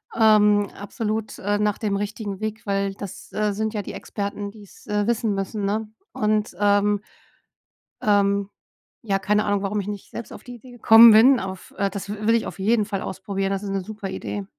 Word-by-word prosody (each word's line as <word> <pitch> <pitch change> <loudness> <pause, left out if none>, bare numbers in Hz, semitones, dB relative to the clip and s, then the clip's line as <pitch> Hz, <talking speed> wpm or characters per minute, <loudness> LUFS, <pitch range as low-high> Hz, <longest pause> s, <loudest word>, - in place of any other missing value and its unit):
ähm, 210 -2 +4
absolut, 215 +1 -4
äh, 205 +1 0
nach 210 -1 0
dem 205 -3 -1
richtigen 205 -1 -4
Weg. 215 0 -5
Weil 195 -1 -1
das, 195 -1 -9
äh, 210 -1 0
sind 220 +2 -2
ja 210 - -2
die - - -8
Experten, 200 0 -5
die 210 0 -14
es, 200 - -18
äh, 210 0 -1
wissen 230 -2 +1
müssen, 195 +1 -3
ne? 215 +2 -1 0.3
Und, 215 0 0
ähm 205 0 +3 1.0
ähm, 200 -1 +2 0.5
ja, 195 -3 0
keine 210 +2 +1
Ahnung, 205 -1 0
warum 205 +1 -1
ich 200 - -4
nicht 205 -1 -6
selbst 235 - -7
auf - - -11
die 245 - -9
Idee 250 +2 -14
gekommen 230 -1 +8
bin. 240 +4 +7
Auf, 190 0 -7
äh 200 0 +1
das 200 0 -7
w 210 +1 -5
will 225 - +5
ich 230 - 0
auf - - -8
jeden 215 +2 +2
Fall 200 -2 -3
ausprobieren. 195 0 -3
Das 195 -1 -2
ist 200 - -4
'ne 195 0 -1
super 205 0 -7
Idee. 195 +1 -5
205 Hz, 205 wpm, -23 LUFS, 200-215 Hz, 1.0 s, gekommen